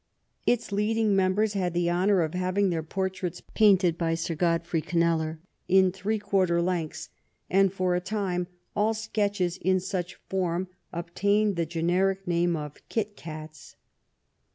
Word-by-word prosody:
Its 240 -3 +1
leading 210 +1 +2
members 195 +3 +2
had 180 -3 -1
the 175 0 +1
honor 185 +2 +3
of 155 - -3
having 185 +2 +1
their 165 -2 -1
por 190 +4 -2
traits 180 -2 -5
painted 190 -6 +4
by 165 -1 +1
Sir 165 +1 -2
Godfrey 165 0 0
Kneller 165 -1 +2 0.3
in 190 0 +5
three 195 +4 -2
quarter 195 -4 +1
lengths, 165 -3 -2 0.4
and 195 0 +4
for 185 -1 0
a 180 - +1
time 185 -2 -2 0.3
all 215 +2 +2
sketches 205 -5 -1
in 185 0 +2
such 180 -1 -3
form 185 -1 -1 0.2
ob 170 0 -6
tained 205 0 +2
the 170 -1 -1
generic 180 +4 0
name 175 0 +2
of 150 -2 -7
Kit 210 -2 -2
Cats. 155 -3 -9
185 Hz, 155 wpm, -27 LUFS, 170-200 Hz, 0.4 s, in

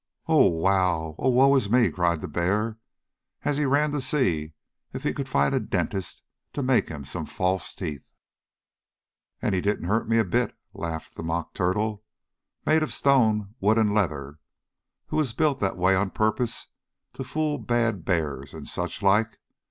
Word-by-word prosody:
"Oh, - - +5
wow! 85 -2 +1
Oh, 130 - +2
woe 135 +2 +5
is 110 -7 +1
me!" 120 +1 +4
cried 85 -3 0
the - - -4
bear, 105 +8 -1 0.6
as 145 - 0
he 150 - +1
ran 145 +2 +2
to 145 -1 -1
see 90 - 0 0.4
if - - -6
he - - 0
could - - -4
find 70 0 +2
a - - +2
dentist 95 -2 -3 0.3
to 145 - -2
make 130 -1 +2
him 75 -3 -7
some - - -5
false 95 0 -1
teeth. 75 -8 -6 1.3
"And - - +1
he 90 - +1
didn't 100 -3 -1
hurt 110 +4 0
me 115 - +3
a 110 - +3
bit," 85 - 0 0.2
laughed 80 -1 -5
the - - -8
Mock 80 +1 -3
Turtle, 105 +3 -1 0.6
made 155 +1 +4
of 155 - -1
stone, 110 -7 +2
wood 105 +3 +3
and 105 -2 +3
leather, 75 -8 -1 0.7
who - - -1
was 145 -7 +1
built 145 +1 +1
that 95 -2 -1
way 90 +2 +3
on 95 +1 +1
purpose 110 +4 -1 0.4
to - - -5
fool 155 -1 -1
bad 115 -6 0
bears 75 -6 -2
and - - -8
such - - -4
like. 105 +3 +3
100 Hz, 175 wpm, -26 LUFS, 85-120 Hz, 1.3 s, Oh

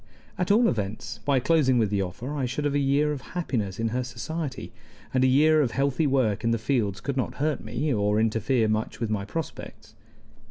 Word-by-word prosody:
At 180 - -2
all 225 +4 +5
events, 110 +1 -3
by 140 -2 +3
closing 130 -2 +3
with 110 -3 +2
the 100 -1 +1
offer 115 +10 -5
I 135 -3 -1
should 140 +4 -3
have 145 - +1
a 145 - +2
year 140 +2 +2
of 145 -3 -4 0.2
happiness 110 - -2
in 115 0 0
her 125 +3 -1
society, 135 +4 -5 0.4
and 130 0 +3
a - - +5
year 155 +4 +5
of 130 -5 0
healthy 140 +2 +1
work 125 -6 +1
in 115 - +2
the 115 - +2
fields 110 -5 0
could 140 0 -3
not 130 - -1
hurt 150 0 -1
me, 120 +7 -1
or 105 -1 +1
interfere 115 +2 +1
much 110 0 -2
with 115 -2 -2
my 100 -2 -1
prospects. 160 +8 -7
130 Hz, 210 wpm, -26 LUFS, 110-145 Hz, 0.4 s, all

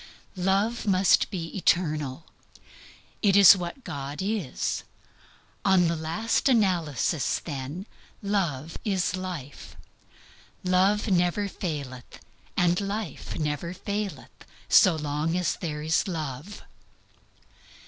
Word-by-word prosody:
Love 195 +5 0
must 190 -1 +4
be 170 -5 -5
eternal. 155 -6 0 1.0
It 200 -2 +4
is 200 -1 +10
what 180 +8 -6
God 145 -4 -6
is. 195 - -2 0.8
On 185 -3 +4
the 170 - 0
last 165 - 0
analysis, 175 - +1
then, 145 +4 -6 0.4
love 165 -7 -1
is 190 -3 0
life. 175 -7 -7 0.9
Love 190 +4 +2
never 180 +2 +2
faileth, 140 - -6 0.4
and 175 +1 +3
life 200 -4 -4
never 155 +3 -2
faileth, 200 -5 -4 0.4
so 185 -3 +6
long 150 +2 -1
as 180 -2 0
there 150 -3 -4
is 160 +5 +1
love. 155 +1 -5
175 Hz, 100 wpm, -26 LUFS, 150-195 Hz, 1.0 s, is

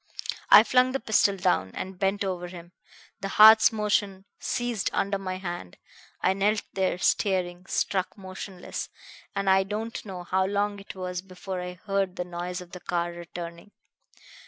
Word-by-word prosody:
"I 210 - +10
flung 255 +2 +3
the 270 - 0
pistol 210 -3 +3
down, 95 - +1
and 185 -1 -6
bent 200 +1 +1
over 180 -2 -3
him. 175 -1 -11 0.5
The 195 - -3
heart's 220 +3 +8
motion 205 -3 0
ceased 240 -4 -1
under 200 0 0
my 185 -1 -4
hand. 175 - -6 0.4
I 185 - +3
knelt 205 +2 +1
there 190 -2 0
staring, 180 -1 0
struck 190 0 -1
motionless; 190 -1 -7 0.5
and 200 0 -1
I 190 0 +6
don't 215 +4 -4
know 185 -4 -7
how 190 +2 +1
long 205 0 -1
it 200 - -10
was 180 -1 -4
before 185 0 -6
I 180 0 -5
heard 195 -2 0
the 180 - -3
noise 180 +1 -5
of 175 -1 -12
the 180 - -8
car 175 0 -2
returning. 170 +2 -8
190 Hz, 160 wpm, -27 LUFS, 180-200 Hz, 0.5 s, I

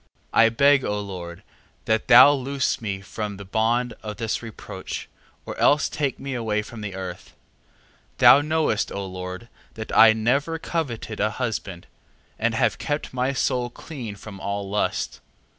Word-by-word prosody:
3:15. - - +2
I 115 0 +7
beg, 140 +4 +4
O 105 0 -1
Lord, 90 -4 -7 0.4
that 110 0 0
thou 125 +3 +9
loose 135 -1 -1
me 100 -3 -3
from 105 0 -5
the 100 - -9
bond 115 +4 0
of 105 -2 -6
this 110 -1 -2
reproach, 115 -3 -7 0.4
or - - -6
else 145 0 +4
take 140 -3 -2
me 135 0 -5
away 110 -3 -1
from 110 +1 -10
the 100 -3 -5
earth. 95 -1 -8 0.8
3:16. - - -39
Thou 140 - +8
knowest, 155 -7 0
O 100 0 -4
Lord, 90 +3 -7 0.3
that 110 0 -6
I 110 -1 +8
never 140 +9 0
coveted 130 -10 -4
a 105 - +2
husband, 105 -6 -4 0.5
and - - +1
have - - +1
kept 145 -2 -3
my 130 +1 0
soul 125 -2 0
clean 120 -6 -8
from 100 -1 -10
all 100 0 -3
lust. 105 +1 -2
110 Hz, 165 wpm, -24 LUFS, 100-130 Hz, 0.8 s, thou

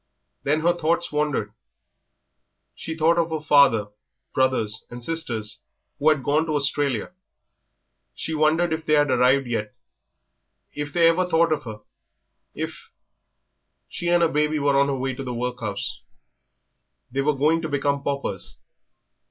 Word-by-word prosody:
Then 150 +3 0
her 175 +2 +3
thoughts 170 +1 0
wandered. 150 -8 -1 1.2
She 160 - -6
thought 165 +2 +3
of 170 0 +1
her 160 -1 -2
father, 140 -8 +4 0.4
brothers, 130 -5 +1
and 120 0 -8
sisters, 120 -9 -1 0.4
who 150 +2 +4
had 150 -4 +1
gone 155 +4 +1
to 155 - -1
Australia. 140 -3 0 1.0
She 160 - -4
wondered 160 +2 +2
if 160 0 -3
they 155 - 0
had 145 -1 +3
yet 130 - +3
arrived, 125 -4 +2 1.0
if 145 0 -5
they 165 +2 +4
ever 180 +2 +2
thought 165 -2 +3
of 150 - -4
her, 110 -2 -8 0.7
if - - -6 1.0
She 175 - -5
and 175 0 +4
her - - +5
baby 150 0 +1
were 140 -1 +2
on 140 0 +4
their 140 - -1
way 130 0 -2
to 135 - -6
the 125 -2 -5
workhouse. 120 -4 -4 1.1
They 135 +2 0
were 150 +1 +1
going 155 +4 +2
to 160 - -4
become 140 0 0
paupers. 140 0 -4
145 Hz, 150 wpm, -24 LUFS, 130-160 Hz, 1.2 s, her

